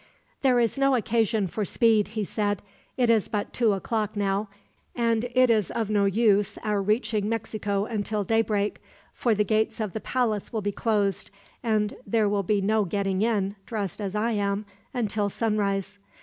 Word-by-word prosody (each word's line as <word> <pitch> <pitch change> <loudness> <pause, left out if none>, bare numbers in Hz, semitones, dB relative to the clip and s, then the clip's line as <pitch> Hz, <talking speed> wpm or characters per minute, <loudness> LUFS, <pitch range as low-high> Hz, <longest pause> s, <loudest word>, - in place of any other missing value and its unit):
"There 255 -3 +4
is 235 +3 +1
no 275 -1 +4
occasion 225 -2 +1
for 210 +4 -3
speed," 220 0 +3
he 215 - +1
said. 205 0 -1 0.3
"It 245 -3 +4
is 220 -3 +2
but 205 -1 -3
two 230 -4 +3
o'clock 215 +2 -2
now, 200 +1 0 0.5
and 230 -1 +1
it 255 -1 +5
is 215 -4 +2
of 220 -2 -2
no 205 -1 +3
use 205 0 +2
our 210 -2 0
reaching 215 0 0
Mexico 210 -3 -2
until 215 -1 -2
daybreak; 210 -1 0 0.3
for 235 -3 +1
the 210 - +2
gates 215 +3 0
of 210 -5 -2
the 220 - -4
palace 230 -5 -1
will 220 -3 -2
be 205 - 0
closed, 205 -3 0 0.3
and 215 -2 0
there 215 +1 +2
will 205 0 +1
be 200 +1 +1
no 215 +2 +2
getting 195 0 -1
in, 205 -3 +1
dressed 210 -3 -3
as 200 0 -3
I 225 +3 +1
am, 205 -1 -1 0.3
until 215 -5 -1
sunrise." 205 -2 -1
210 Hz, 175 wpm, -26 LUFS, 200-225 Hz, 0.5 s, it